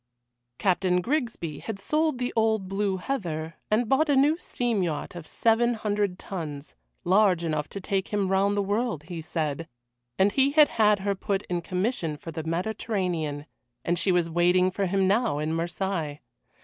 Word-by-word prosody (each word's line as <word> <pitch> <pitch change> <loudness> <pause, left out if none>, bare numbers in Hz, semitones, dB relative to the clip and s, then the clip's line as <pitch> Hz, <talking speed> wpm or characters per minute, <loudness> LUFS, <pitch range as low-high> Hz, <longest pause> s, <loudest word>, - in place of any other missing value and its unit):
Captain 185 -1 +2
Grigsby 230 - -2
had 220 -3 -5
sold 305 +7 0
the 245 0 -2
old 220 -3 +2
Blue 195 0 0
Heather 165 - -4
and 220 +2 +2
bought 295 +6 +3
a 285 - +4
new 285 +4 +4
steam 240 - -1
yacht 160 -5 -2
of 170 -3 -8
seven 235 +1 +2
hundred 205 -3 -1
tons 155 -8 -6 0.3
large 185 -2 +4
enough 155 -3 -1
to 200 - -6
take 195 0 -1
him 205 -2 0
round 200 +1 +2
the 200 - +2
world, 205 - -1
he 170 0 -6
said 160 -1 -3 0.5
and 195 +2 +4
he 275 +3 +2
had 305 -1 +7
had 210 -2 +3
her 200 0 0
put 195 0 -2
in 175 -1 0
commission 180 -3 -2
for 165 - -8
the 160 0 -4
Mediterranean, 170 -4 -2 0.4
and 175 +1 +1
she 195 - +2
was 175 -2 +2
waiting 180 +2 +3
for 195 +1 -1
him 190 +1 +2
now 215 -4 +2
at 150 +1 -1
Marseilles. 165 -2 -2
190 Hz, 175 wpm, -26 LUFS, 170-220 Hz, 0.5 s, had